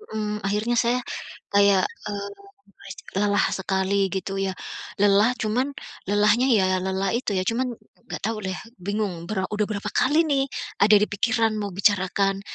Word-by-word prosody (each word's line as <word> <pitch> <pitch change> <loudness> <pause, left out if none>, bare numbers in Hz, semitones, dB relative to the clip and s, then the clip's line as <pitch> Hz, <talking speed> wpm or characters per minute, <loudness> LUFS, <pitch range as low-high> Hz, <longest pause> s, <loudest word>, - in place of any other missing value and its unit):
mhm, 210 -1 -2
akhirnya 210 +4 0
saya 240 +2 +2 0.5
kayak, 200 -2 +5 0.2
eee, 200 -1 -4 0.4
merasa - - -11 0.2
lelah 205 0 +3
sekali 190 +1 0
gitu 195 +1 -3
ya 195 - 0 0.5
lelah 205 +4 +4
cuman 225 +5 0 0.4
lelahnya 210 +5 +4
ya 185 -5 +3
lelah 190 +1 -1
itu 235 -4 -1
ya 185 - +1
cuman 245 +5 0 0.4
enggak - - -4
tahu 225 0 -1
deh 190 -2 -3 0.3
bingung 195 -3 -3
bera 195 -3 -1
udah 210 0 +1
berapa 210 0 -3
kali 310 +5 +3
nih, 275 -3 +2 0.4
ada 210 +1 +7
di - - +4
pikiran 225 +2 +1
mau 205 - -3
bicarakan 195 0 +2
205 Hz, 155 wpm, -24 LUFS, 195-220 Hz, 0.5 s, ada